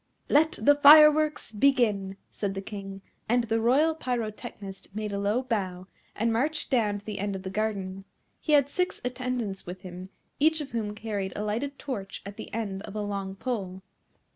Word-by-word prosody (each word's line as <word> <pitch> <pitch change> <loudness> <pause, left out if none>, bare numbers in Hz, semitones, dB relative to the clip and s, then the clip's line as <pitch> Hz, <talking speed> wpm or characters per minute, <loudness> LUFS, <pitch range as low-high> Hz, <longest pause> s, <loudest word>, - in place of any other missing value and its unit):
"Let 315 +2 +4
the 255 +7 +4
fireworks 300 0 +7
begin," 210 -5 +2
said 200 -2 -3
the 195 - -3
King; 195 -1 -7 0.3
and 240 +1 +3
the 225 0 0
Royal 280 +8 +4
Pyrotechnist 215 -7 -5
made 215 -1 -3
a 200 - -1
low 210 +5 +1
bow, 190 -7 -2 0.3
and 225 +1 +1
marched 295 +8 -1
down 215 -5 +2
to 205 - -13
the 210 -2 -5
end 200 0 -2
of 190 - -6
the 190 - -5
garden. 195 -2 -3 0.3
He 305 - 0
had 285 -2 +6
six 360 +5 -1
attendants 250 -7 -3
with 180 +1 -7
him, 185 0 -9 0.3
each 315 +2 +4
of 290 -3 -6
whom 215 -3 -3
carried 205 -3 -3
a 210 - -3
lighted 245 +7 -2
torch 200 -9 -6
at 200 0 -8
the - - -8
end 200 -4 -3
of 200 - -9
a 210 - -2
long 200 -2 -4
pole. 195 -5 -4
215 Hz, 185 wpm, -27 LUFS, 195-255 Hz, 0.3 s, fireworks